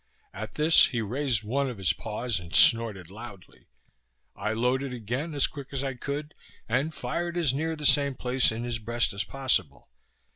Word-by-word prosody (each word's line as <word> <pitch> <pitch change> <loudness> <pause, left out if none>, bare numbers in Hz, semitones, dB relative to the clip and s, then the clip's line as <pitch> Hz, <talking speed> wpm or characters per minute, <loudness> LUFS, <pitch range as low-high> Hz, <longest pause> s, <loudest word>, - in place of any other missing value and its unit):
At 110 +2 -8
this 155 +2 +6
he 120 - -3
raised 120 +1 -1
one 135 +5 -1
of 120 - -7
his 90 -4 +1
paws 110 +2 -3
and 85 -1 -6
snorted 105 -6 +5
loudly. 105 -3 -12 0.7
I 110 +2 -3
loaded 125 +3 -1
again 125 +8 -4
as 140 - +3
quick 140 -3 -7
as 135 -1 -2
I 135 -1 -3
could, 145 +4 -5 0.3
and 140 +5 0
fired 170 +2 -4
as 160 -7 +2
near 160 +3 -2
the 150 -1 -6
same 140 0 +4
place 125 0 +1
in 115 +1 -5
his 120 -1 -2
breast 115 +1 0
as 100 - -2
possible. 125 - -2
125 Hz, 180 wpm, -27 LUFS, 110-140 Hz, 0.7 s, this